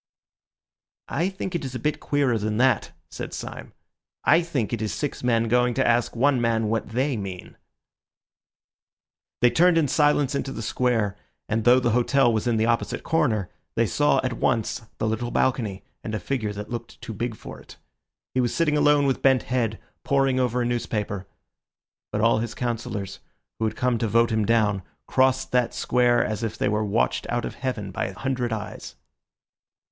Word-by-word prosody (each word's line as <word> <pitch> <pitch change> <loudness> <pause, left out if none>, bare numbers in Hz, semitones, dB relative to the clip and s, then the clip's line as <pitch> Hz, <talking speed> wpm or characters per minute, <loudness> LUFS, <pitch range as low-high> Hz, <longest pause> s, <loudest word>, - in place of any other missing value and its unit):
"I 170 +6 0
think 190 -1 -5
it 170 - -2
is 130 -1 -5
a - - -3
bit 150 +5 -1
queerer 135 -6 +1
than 105 +1 -2
that," 130 -2 +2 0.2
said - - -6
Syme. - - -7 0.5
"I 165 - +5
think 140 -10 -2
it 115 - -2
is 110 - -1
six 145 - -3
men 115 -2 +2
going 125 +1 +2
to 135 - +2
ask 120 0 +2
one 130 +1 +3
man 115 -2 +1
what 110 -1 -1
they 130 +4 0
mean." 95 -4 -7 1.9
They 120 - +5
turned 175 0 +4
in 160 -3 +3
silence 145 -1 +2
into 140 -1 -2
the 115 - -5
Square, 110 -3 0 0.3
and 110 0 -1
though 125 +1 +7
the 120 -2 +1
hotel 125 +1 +3
was 110 +2 -1
in 115 -2 +2
the 110 - +2
opposite 115 0 0
corner, 120 - +1 0.2
they 115 - +3
saw 145 +6 +2
at 130 -1 -1
once 115 -1 0 0.2
the 110 - -1
little 110 +2 -1
balcony 110 -7 0 0.2
and 110 - -3
a - - -2
figure 110 +1 -2
that 105 +2 -7
looked 115 -1 -6
too 115 - -7
big 115 +2 -3
for - - -10
it. - - -15 0.6
He 130 - +2
was 120 - -1
sitting 155 -3 +2
alone 145 -1 +4
with 135 -2 0
bent 135 -2 +4
head, 115 -4 -1 0.2
poring 135 -2 +2
over 125 -1 +1
a - - -1
newspaper. 105 -5 -2 0.8
But 105 - -1
all 115 0 +4
his 115 0 -4
councillors, 110 -5 -4 0.4
who 110 - +1
had 110 - -1
come 125 -2 0
to 115 - 0
vote 115 +2 +3
him 110 -1 +1
down, 105 -4 +2 0.2
crossed 130 0 +2
that 125 -2 +1
Square 120 -1 +2
as 110 +1 -3
if 115 -2 -3
they - - +1
were 105 +1 0
watched 105 +2 0
out 120 0 -1
of - - -5
heaven 115 -7 -4
by - - -2
a 95 -1 -7
hundred 130 -3 -2
eyes. 105 - -6
120 Hz, 190 wpm, -25 LUFS, 110-130 Hz, 1.9 s, though